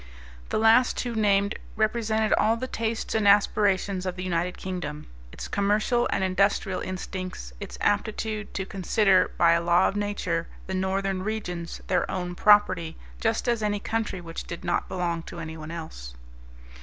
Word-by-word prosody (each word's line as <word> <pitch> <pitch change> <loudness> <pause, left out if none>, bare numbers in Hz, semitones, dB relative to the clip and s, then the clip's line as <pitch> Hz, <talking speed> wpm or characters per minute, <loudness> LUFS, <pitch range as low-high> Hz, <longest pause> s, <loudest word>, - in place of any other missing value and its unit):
The - - 0
last 225 +3 +5
two 240 -1 -2
named 200 -2 +2 0.2
represented 220 0 +1
all 220 +2 +3
the 255 - -3
tastes 230 -3 -3
and 220 -2 +2
aspirations 200 -2 +3
of 180 - -2
the 185 - -5
United 180 0 -1
Kingdom, 180 -5 -5 0.3
its - - -7
commercial 210 +4 +1
and 190 - 0
industrial 190 0 +1
instincts, 185 - -6
its - - -7
aptitude 215 +1 -1
to 190 - -2
consider, 190 0 +2
by 170 -1 +5
a 170 0 +3
law 175 +2 +4
of - - -2
nature, 200 -5 -1 0.2
the 190 - -5
northern 190 0 -1
regions 180 -5 -4
their 180 - 0
own 180 -1 -3
property 185 -4 +4 0.2
just 225 +2 0
as 235 -2 +1
any 205 -1 0
country 220 -2 -2
which 165 -1 -7
did 170 - -7
not 175 - 0
belong 175 -2 -1
to 170 - -10
anyone 160 -1 -7
else. 160 - -8
190 Hz, 160 wpm, -26 LUFS, 175-215 Hz, 0.3 s, last